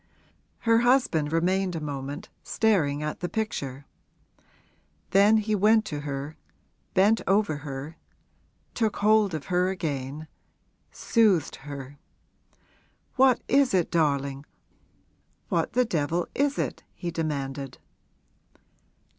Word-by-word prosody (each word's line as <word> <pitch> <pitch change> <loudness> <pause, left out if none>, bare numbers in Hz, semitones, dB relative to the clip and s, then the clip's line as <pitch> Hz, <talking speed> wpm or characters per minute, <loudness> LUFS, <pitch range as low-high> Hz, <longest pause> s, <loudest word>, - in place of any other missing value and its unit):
Her 230 0 +4
husband 240 - +2
remained 180 +2 +1
a - - -2
moment 140 -1 -6
staring 155 -10 +1
at 150 - -4
the 175 - -3
picture; 145 - -4 1.3
then 205 +3 +5
he 215 0 -1
went 215 +2 +4
to 150 -8 -4
her, 145 +1 -5 0.6
bent 205 +4 +4
over 195 -6 +2
her, 145 +2 -7 0.8
took 220 -3 0
hold 210 -3 +3
of 150 - -5
her 180 +1 +3
again, 150 -4 -4 0.6
soothed 210 - +2
her. 140 0 -9 1.2
'What 260 -2 +4
is 275 -6 +3
it, 175 -3 +1
darling, 140 -3 0 1.0
what - - 0
the 250 0 +3
devil 170 -2 -1
is 285 0 0
it?' - - -2
he 175 -2 -4
demanded. 140 -4 -4
165 Hz, 110 wpm, -26 LUFS, 145-215 Hz, 1.3 s, then